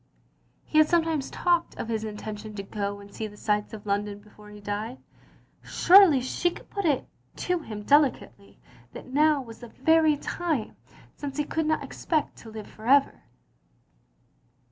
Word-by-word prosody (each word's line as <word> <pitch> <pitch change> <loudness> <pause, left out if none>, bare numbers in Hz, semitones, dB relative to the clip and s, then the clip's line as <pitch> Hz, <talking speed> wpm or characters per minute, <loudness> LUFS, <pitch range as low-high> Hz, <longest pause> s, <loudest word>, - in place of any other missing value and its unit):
He 310 - +2
had 310 - +6
sometimes 325 -5 +1
talked 345 -1 0
of - - -4
his 220 -1 -2
intention 215 0 -7
to 200 - -5
go 200 0 -4
and 200 0 -14
see 220 - -4
the 210 0 -14
sights 210 -1 -1
of 215 -2 -9
London 205 0 -1
before 210 0 -16
he 210 0 -11
died. 205 +5 -4 0.6
Surely 360 -6 +6
she 300 +7 0
could - - -13
put 400 -2 -3
it 290 -5 +1 0.3
to 360 -1 -1
him 215 -9 -7
delicately, 275 -7 +1 0.3
that 255 - -10
now 300 -1 +3
was 230 -2 -12
the 240 - -10
very 315 +4 +3
time, 305 -7 -3 0.4
since 285 -1 -6
he 295 - +1
could 320 +1 -2
not 315 - +1
expect 310 -3 -2
to 225 - -12
live 215 -1 -8
for 220 +1 -11
ever. 275 +1 +3
245 Hz, 165 wpm, -26 LUFS, 210-310 Hz, 0.6 s, had